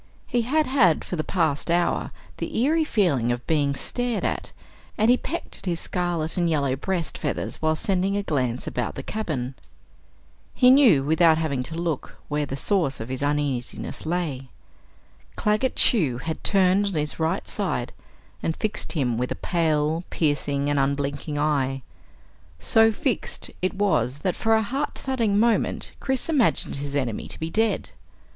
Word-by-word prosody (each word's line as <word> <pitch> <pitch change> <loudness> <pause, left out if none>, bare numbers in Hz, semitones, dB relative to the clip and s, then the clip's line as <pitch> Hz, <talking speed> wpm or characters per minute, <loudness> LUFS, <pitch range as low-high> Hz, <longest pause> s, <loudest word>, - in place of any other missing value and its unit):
He 240 - 0
had 300 +7 +1
had 220 - +3
for - - -4
the 155 - -1
past 160 -4 0
hour 175 +1 +1 0.3
the - - -4
eerie 310 +7 +3
feeling 165 - +1
of 120 0 -3
being 145 -3 +1
stared 245 - -1
at, - - -2 0.5
and 220 +3 +4
he - - +6
pecked 335 +6 -5
at - - -9
his 170 -2 0
scarlet 175 -3 -2
and 175 -1 +2
yellow 140 -4 +1
breast 170 +3 -3
feathers - - -3
while 155 0 +2
sending 195 +3 0
a 205 - -1
glance 130 -8 -1
about 120 -2 -3
the - - -5
cabin. 145 - -3 1.0
He 250 0 +6
knew 250 - +6
without 160 +2 +4
having 150 -5 -1
to 155 +6 -6
look, 165 -4 -3
where 150 -1 -1
the 135 - -4
source 165 -3 0
of 115 +2 -6
his 130 +1 -4
uneasiness 145 -4 -2
lay. 155 -7 -2 0.9
Claggett 215 +5 +1
Chew 155 - +4
had 160 +5 -5
turned 195 0 +4
on 200 - -2
his 150 -1 -2
right 165 +4 -1
side 175 - -2 0.5
and 165 - -1
fixed 215 -1 -3
him 125 -8 0
with 125 - -2
a - - -1
pale, 160 -1 0
piercing, 145 -2 0
and 145 -1 +1
unblinking 140 +2 -1
eye. 135 -3 0 0.7
So 225 - +4
fixed, 235 +1 -2
it 185 +1 0
was, 140 - +1
that 185 - +1
for 225 0 +2
a 220 - +2
heart 270 +7 -2
thudding 230 -6 0
moment 230 0 +1
Chris 265 -2 -1
imagined 285 - +1
his 140 0 -5
enemy 130 -6 -2
to - - -8
be 160 +1 -3
dead. 225 +3 0
165 Hz, 165 wpm, -24 LUFS, 140-205 Hz, 1.0 s, he